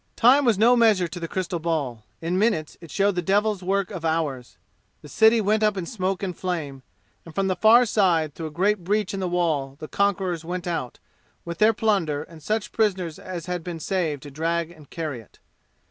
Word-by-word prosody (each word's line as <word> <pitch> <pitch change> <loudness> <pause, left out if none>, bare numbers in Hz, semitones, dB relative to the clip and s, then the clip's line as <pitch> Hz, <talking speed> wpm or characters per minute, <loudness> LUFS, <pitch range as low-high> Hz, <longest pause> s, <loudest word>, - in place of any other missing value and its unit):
Time 265 +4 +5
was 230 -5 +3
no 235 +4 +5
measure 215 -7 +4
to 170 +2 -7
the 165 - -4
crystal 180 0 -3
ball. 145 -9 -2 0.2
In 175 +3 0
minutes 195 -8 0
it 165 - -11
showed 200 +4 +1
the 180 - -1
devil's 205 +2 +1
work 195 +2 -1
of 180 -5 -6
hours. 155 -6 -2 0.5
The - - -10
city 220 - +4
went 215 +1 +1
up 210 -2 +2
in 180 - -3
smoke 190 -2 -2
and 185 -3 -3
flame, 155 -8 -4 0.4
and 165 - -13
from 195 - +1
the 185 - 0
far 225 +6 +6
side 175 -9 +2
through 160 +1 -5
a - - -6
great 190 +5 0
breach 205 +2 0
in 195 - -3
the 185 - -1
wall 155 -6 0
the 155 - -7
conquerors 190 -4 0
went 175 +1 -4
out, 165 -8 -3 0.5
with 170 0 -6
their 215 +1 +6
plunder 190 -10 0
and 160 -1 -14
such 215 +6 -2
prisoners 185 -7 0
as 175 -3 -6
had 180 -2 -3
been 170 -1 -6
saved 160 -6 -2
to 145 - -9
drag 165 +3 -1
and 155 -5 -16
carry 155 -6 -4
it. 110 - -18
180 Hz, 210 wpm, -24 LUFS, 160-205 Hz, 0.5 s, far